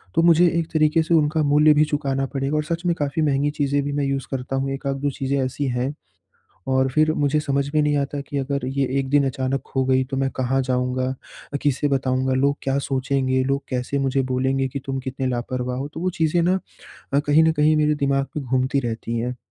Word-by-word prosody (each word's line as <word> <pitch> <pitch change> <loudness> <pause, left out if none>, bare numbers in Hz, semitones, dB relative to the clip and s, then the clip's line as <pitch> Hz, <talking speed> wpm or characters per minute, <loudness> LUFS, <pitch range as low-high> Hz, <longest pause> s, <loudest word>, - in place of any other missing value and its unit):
तो - - +4
मुझे 170 +1 +6
एक 165 - -2
तरीके 155 +1 +3
से 170 - -1
उनका 155 0 +3
मूल्य 150 +1 +5
भी 150 +1 +4
चुकाना 140 -2 -1
पड़ेगा 135 +2 -1
और 150 - 0
सच 170 +2 -3
में 170 - +3
काफ़ी 145 +1 -2
महँगी 145 0 +1
चीजें 145 -1 0
भी 145 - -3
मैं 145 0 0
यूज़ 135 -1 -2
करता 135 0 -3
हूँ, 135 +1 -1
1 135 +1 -6
आध 135 - 0
2 145 - +1
चीज़ें 135 +1 -2
ऐसी 135 +2 -3
हैं। 125 +3 -1 0.8
और 130 0 +2
फिर 155 +3 +3
मुझे 145 0 +1
समझ 140 -1 -1
में 150 - +4
नहीं 150 0 +2
आता 140 0 -2
कि 140 0 -6
अगर 140 -1 -2
ये 135 +1 0
एक 135 -1 -3
दिन 145 0 +3
अचानक 135 0 -2
खो 135 -1 -1
गई 130 0 +3
तो 135 - -1
मैं 135 0 +1
कहाँ 130 +1 +1
जाऊँगा? 125 0 -1 0.5
अ, - - 0
किसे 145 0 +1
बताऊँगा? 130 -1 0
लोग 140 +2 +2
क्या 135 0 0
सोचेंगे? 130 -1 0
लोग 140 +1 -1
कैसे 125 +2 -2
मुझे 135 0 +1
बोलेंगे 135 +1 +1
कि 140 +2 -5
तुम 135 0 -2
कितने 130 0 -3
लापरवाह 125 0 -3
हो? 140 +2 -3
तो 160 +2 -9
वो 185 - +1
चीजें 160 +2 +3
ना 185 +2 +2 0.5
अ, 140 - +4
कहीं 150 +2 +4
न 160 - +4
कहीं 155 +1 +3
मेरे 150 0 +3
दिमाग 135 0 +1
में 145 - -3
घूमती 130 +2 +1
रहती 115 -1 -3
हैं। 125 +2 -3
140 Hz, 230 wpm, -22 LUFS, 130-145 Hz, 0.8 s, मुझे